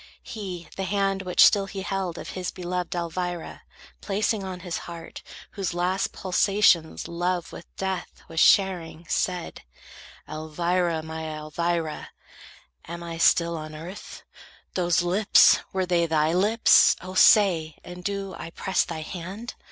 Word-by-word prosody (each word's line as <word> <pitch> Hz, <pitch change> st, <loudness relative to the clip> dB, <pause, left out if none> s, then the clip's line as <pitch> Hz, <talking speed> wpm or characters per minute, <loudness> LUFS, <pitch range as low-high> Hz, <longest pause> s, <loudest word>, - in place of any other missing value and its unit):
He 185 Hz, -6 st, -7 dB
The 195 Hz, -, -2 dB
hand, 195 Hz, 0 st, 0 dB
which 185 Hz, -2 st, +5 dB
still 200 Hz, -1 st, +4 dB
he 195 Hz, 0 st, -6 dB
held, 185 Hz, -2 st, -3 dB
of -, -, -7 dB
his 185 Hz, -1 st, -4 dB
beloved 180 Hz, 0 st, -4 dB
Elvira, 175 Hz, 0 st, -4 dB, 0.4 s
placing 205 Hz, +1 st, -1 dB
on 185 Hz, -1 st, -6 dB
his 175 Hz, -2 st, -4 dB
heart, 165 Hz, -1 st, -9 dB, 0.3 s
whose 190 Hz, -4 st, -3 dB
last 185 Hz, +3 st, 0 dB
Pulsations 185 Hz, -3 st, +2 dB
love 175 Hz, +1 st, -2 dB
with -, -, -10 dB
death 190 Hz, -2 st, -4 dB
was 165 Hz, 0 st, -3 dB
sharing, 175 Hz, -4 st, +3 dB
said: 180 Hz, -4 st, -2 dB, 0.7 s
"Elvira, 170 Hz, +1 st, -1 dB
my 160 Hz, 0 st, -6 dB
Elvira, 155 Hz, +1 st, -3 dB, 0.8 s
am 170 Hz, +1 st, -7 dB
I 165 Hz, -1 st, -6 dB
still 170 Hz, 0 st, +3 dB
On 155 Hz, -1 st, -7 dB
earth? 170 Hz, +6 st, -9 dB, 0.5 s
Those 175 Hz, -2 st, +1 dB
lips, 195 Hz, +4 st, +5 dB
were 190 Hz, -1 st, -1 dB
they 175 Hz, -2 st, +1 dB
thy 160 Hz, 0 st, +2 dB
lips? 210 Hz, +6 st, +5 dB
O, 185 Hz, 0 st, -8 dB
say! 180 Hz, -6 st, +5 dB
And 180 Hz, 0 st, -10 dB
do 200 Hz, -1 st, -3 dB
I 165 Hz, -, -6 dB
press 190 Hz, +3 st, 0 dB
thy 160 Hz, -2 st, -6 dB
hand? 185 Hz, +8 st, -7 dB
180 Hz, 140 wpm, -25 LUFS, 165-190 Hz, 0.8 s, which